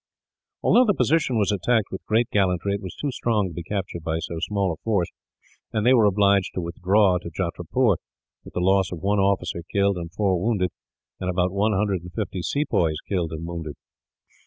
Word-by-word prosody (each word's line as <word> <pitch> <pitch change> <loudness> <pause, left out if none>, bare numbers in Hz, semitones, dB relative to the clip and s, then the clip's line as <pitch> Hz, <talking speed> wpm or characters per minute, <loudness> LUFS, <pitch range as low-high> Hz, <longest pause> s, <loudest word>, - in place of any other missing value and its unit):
Although 250 - +5
the 205 -4 +2
position 155 -7 +2
was 105 -1 +2
attacked 105 +2 +1
with 95 - -6
great 115 +2 +2
gallantry, 95 -1 +1
it 100 - -3
was 95 -3 -7
too 145 - -3
strong 110 -5 0
to 85 - -8
be 85 - -5
captured 90 -1 -4
by 80 0 -1
so 85 0 -4
small 100 0 0
a - - -9
force; 100 -6 +1 0.6
and 105 0 -1
they 125 - +6
were 115 -4 +5
obliged 100 -1 +2
to 90 - -1
withdraw 90 +2 +2
to 85 - -7
Jatrapur, 90 +5 0 0.5
with - - -13
the 90 - 0
loss 95 0 +3
of 90 - -4
one 100 +1 +2
officer 95 -3 0
killed 100 -1 +2
and 85 -1 -6
four 95 -2 0
wounded, 100 -5 +1 0.5
and 90 - -2
about 90 0 +1
one 105 +3 +1
hundred 95 -2 0
and 90 0 -11
fifty 95 -2 -3
sepoys 85 - 0
killed 90 -5 -1
and 80 0 -5
wounded. 85 -3 -5
95 Hz, 200 wpm, -24 LUFS, 90-105 Hz, 0.6 s, they